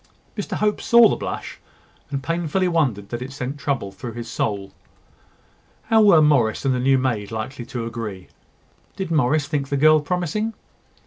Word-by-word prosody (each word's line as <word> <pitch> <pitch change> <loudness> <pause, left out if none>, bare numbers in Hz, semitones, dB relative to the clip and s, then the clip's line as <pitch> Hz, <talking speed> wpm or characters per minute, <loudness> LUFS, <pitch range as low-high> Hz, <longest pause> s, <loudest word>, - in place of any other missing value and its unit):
Mr 205 - -4
Hope 210 0 0
saw 235 -1 +7
the - - 0
blush, - - -6 0.5
and 140 -1 -4
painfully 170 +3 0
wondered 130 - 0
that 120 0 -5
it 130 +2 -6
sent 135 +1 -5
trouble 135 -9 -2
through 110 +5 -8
his 120 0 -7
soul. 100 -3 -3 1.2
How 225 -1 +5
were 185 -7 +6
Morris 135 -6 +2
and 135 - +3
the 125 - -1
new 135 +2 +3
maid 120 -6 -1
likely 115 +3 -5
to 120 -2 -4
agree? 115 -5 -6 0.7
Did 190 -3 -4
Morris 145 -1 +2
think 140 -2 -2
the 140 - 0
girl 155 +2 +6
promising? 180 +8 -2
140 Hz, 170 wpm, -22 LUFS, 115-165 Hz, 1.2 s, saw